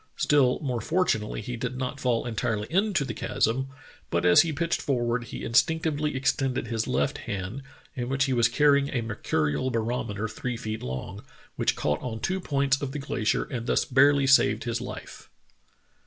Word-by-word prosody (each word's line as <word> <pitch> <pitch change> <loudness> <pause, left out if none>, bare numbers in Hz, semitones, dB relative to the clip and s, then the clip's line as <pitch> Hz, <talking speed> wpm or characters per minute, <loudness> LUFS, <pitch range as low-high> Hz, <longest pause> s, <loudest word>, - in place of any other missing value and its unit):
Still 135 -4 +3
more 125 -4 -2
fortunately 115 -10 0
he 125 +3 -5
did 125 +2 -4
not 130 +2 -3
fall 120 -3 0
entirely 110 -2 -1
into 190 -4 +2
the - - -4
chasm, 130 +4 0 0.4
but 85 +1 0
as 90 0 +8
he 165 - -1
pitched 165 +3 -1
forward 120 -3 0
he - - -7
instinc 160 +8 +2
tively 150 -2 -1
extended 130 0 0
his 115 -1 -2
left 70 - 0
hand, 100 +7 -4 0.3
in 125 -1 -3
which 135 0 +1
he 135 -1 0
was 120 -1 +4
carrying 140 +2 +3
a 125 -4 -1
mercurial 80 - -1
barometer 115 -2 -2
three 120 +2 -4
feet 110 -1 -5
long, 65 0 -6 0.3
which - - +1
caught 75 +1 -1
on 115 -3 -4
two 190 +9 -1
points 140 -3 +1
of 135 -2 -4
the - - -3
glacier 125 -6 0
and 120 -3 -5
thus - - +2
barely 140 +1 +4
saved 115 -5 +4
his 120 0 -2
life. 125 - -9
125 Hz, 180 wpm, -27 LUFS, 115-140 Hz, 0.4 s, as